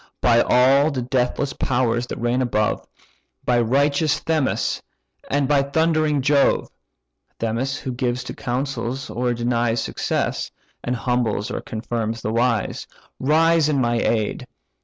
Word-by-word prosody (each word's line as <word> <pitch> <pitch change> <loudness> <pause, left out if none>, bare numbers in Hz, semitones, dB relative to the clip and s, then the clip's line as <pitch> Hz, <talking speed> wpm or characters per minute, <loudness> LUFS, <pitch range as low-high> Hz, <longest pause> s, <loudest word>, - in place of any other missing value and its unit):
By 120 -1 +4
all 135 +5 +4
the 130 -5 -3
deathless 130 +2 0
powers 120 -2 0
that - - -5
reign 120 +2 0
above, 110 -4 0 0.6
By 120 -1 +3
righteous 140 +5 +2
Themis 155 -5 0 0.5
and 145 -1 +1
by 145 -1 +4
thundering 155 0 +1
Jove 140 +1 +2 0.7
(Themis, 120 +5 -2
who 130 - -5
gives 125 0 -2
to - - -6
councils, 130 0 -3
or 120 0 -1
denies 120 -1 0
Success; - - -2 0.3
and 125 - -1
humbles, 120 -4 -1
or - - -3
confirms 115 0 -3
the 110 - -2
wise), 115 -2 0 0.3
Rise 160 +2 +3
in 145 -3 +1
my 120 -2 +1
aid! 110 -3 -1
125 Hz, 135 wpm, -22 LUFS, 120-140 Hz, 0.7 s, By